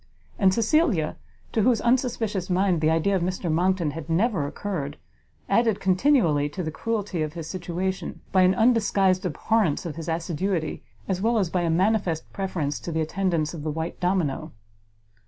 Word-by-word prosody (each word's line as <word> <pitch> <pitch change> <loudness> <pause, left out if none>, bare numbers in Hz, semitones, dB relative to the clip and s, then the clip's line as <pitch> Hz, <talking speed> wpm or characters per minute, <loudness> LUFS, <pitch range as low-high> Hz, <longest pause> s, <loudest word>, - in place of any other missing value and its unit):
And 195 -3 +5
Cecilia, 225 - +2 0.4
to 220 - +1
whose 235 +1 +3
unsuspicious 235 -6 0
mind 180 -2 +2
the 155 - +3
idea 165 +5 +2
of 185 - 0
Mr 180 -1 -2
Monckton 175 -1 +1
had 160 0 -8
never 175 - +1
occurred, 150 -4 -4 0.5
added 225 -3 +2
continually 185 - +3
to 180 +5 -5
the 155 - -3
cruelty 205 -2 -2
of 155 -1 -2
his 165 -2 -6
situation, 185 +1 -4
by 190 - +4
an 185 +1 +4
undisguised 200 -5 +3
abhorrence 185 -1 0
of 165 -2 -5
his 165 0 -5
assiduity, 165 +1 -2 0.3
as 190 -1 -1
well 230 +2 +2
as 190 -6 0
by 180 - +1
a 170 - 0
manifest 180 -2 0
preference 170 -7 -2
to 170 - -6
the 160 0 0
attendance 165 -1 -1
of 165 - -6
the 155 - -3
white 160 +2 -4
domino. 180 -6 -1
185 Hz, 170 wpm, -25 LUFS, 160-200 Hz, 0.5 s, And